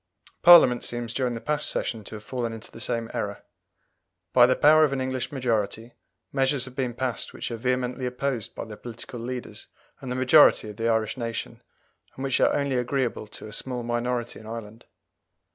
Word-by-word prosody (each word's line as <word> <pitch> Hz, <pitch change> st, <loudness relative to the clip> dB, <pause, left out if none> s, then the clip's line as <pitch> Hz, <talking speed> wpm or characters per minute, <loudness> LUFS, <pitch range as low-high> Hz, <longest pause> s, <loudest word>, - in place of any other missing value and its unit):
Parliament 165 Hz, -8 st, +8 dB
seems 120 Hz, -1 st, -3 dB
during 125 Hz, -2 st, -1 dB
the -, -, -4 dB
past 150 Hz, +5 st, 0 dB
Session 110 Hz, -3 st, -2 dB
to 110 Hz, -, -8 dB
have 105 Hz, -, -9 dB
fallen 120 Hz, -2 st, -3 dB
into 115 Hz, 0 st, -9 dB
the -, -, -11 dB
same 115 Hz, 0 st, -2 dB
error. -, -, -4 dB, 0.9 s
By 120 Hz, -1 st, +7 dB
the 130 Hz, -, +3 dB
power 155 Hz, +1 st, +6 dB
of 150 Hz, -, +3 dB
an 135 Hz, -, -1 dB
English 130 Hz, -1 st, -2 dB
majority, 115 Hz, -3 st, -2 dB, 0.4 s
measures 135 Hz, -1 st, +2 dB
have 130 Hz, -1 st, -11 dB
been 125 Hz, -3 st, -2 dB
passed 125 Hz, -2 st, -3 dB
which -, -, -5 dB
are -, -, -2 dB
vehemently 125 Hz, +1 st, -1 dB
opposed 125 Hz, -2 st, -3 dB
by -, -, -5 dB
the 110 Hz, -1 st, -9 dB
political 120 Hz, +1 st, -8 dB
leaders 125 Hz, +1 st, -6 dB, 0.3 s
and 130 Hz, -, -7 dB
the -, -, -2 dB
majority 130 Hz, -4 st, +5 dB
of 105 Hz, -, -15 dB
the 115 Hz, +1 st, 0 dB
Irish 110 Hz, +2 st, 0 dB
nation, 115 Hz, -2 st, -5 dB, 0.5 s
and 130 Hz, -, -6 dB
which 135 Hz, -2 st, +1 dB
are -, -, +5 dB
only 140 Hz, -2 st, 0 dB
agreeable 125 Hz, -3 st, -1 dB
to 105 Hz, -, -10 dB
a 105 Hz, -, -10 dB
small 125 Hz, +1 st, -3 dB
minority 120 Hz, 0 st, -2 dB
in 110 Hz, -, -13 dB
Ireland. 115 Hz, 0 st, -8 dB
125 Hz, 195 wpm, -26 LUFS, 115-130 Hz, 0.9 s, Parliament